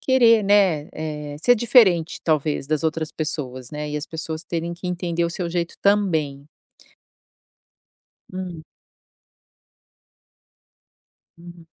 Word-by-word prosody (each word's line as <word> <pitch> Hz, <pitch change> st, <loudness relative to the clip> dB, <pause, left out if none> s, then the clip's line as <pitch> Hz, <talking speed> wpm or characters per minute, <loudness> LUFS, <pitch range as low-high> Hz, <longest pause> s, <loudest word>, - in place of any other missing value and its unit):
querer, 235 Hz, -4 st, +5 dB
né, 195 Hz, -7 st, +3 dB
eh, 150 Hz, -2 st, -5 dB
ser 245 Hz, -, +6 dB
diferente, 215 Hz, -8 st, +4 dB
talvez, 155 Hz, -3 st, 0 dB
das 155 Hz, +1 st, -1 dB
outras 160 Hz, -1 st, -2 dB
pessoas, 130 Hz, -5 st, -4 dB
né. 150 Hz, 0 st, -5 dB
E 150 Hz, -, -3 dB
as 150 Hz, +1 st, -4 dB
pessoas 160 Hz, -1 st, -5 dB
terem 170 Hz, 0 st, -3 dB
que 175 Hz, +2 st, -8 dB
entender 175 Hz, -1 st, -1 dB
o 170 Hz, -, -1 dB
seu 170 Hz, 0 st, -4 dB
jeito 170 Hz, -1 st, -2 dB
também. 160 Hz, -9 st, +1 dB, 1.8 s
Hum. 180 Hz, -3 st, -6 dB, 2.8 s
Hum. 170 Hz, -1 st, -13 dB
165 Hz, 110 wpm, -22 LUFS, 155-185 Hz, 2.8 s, ser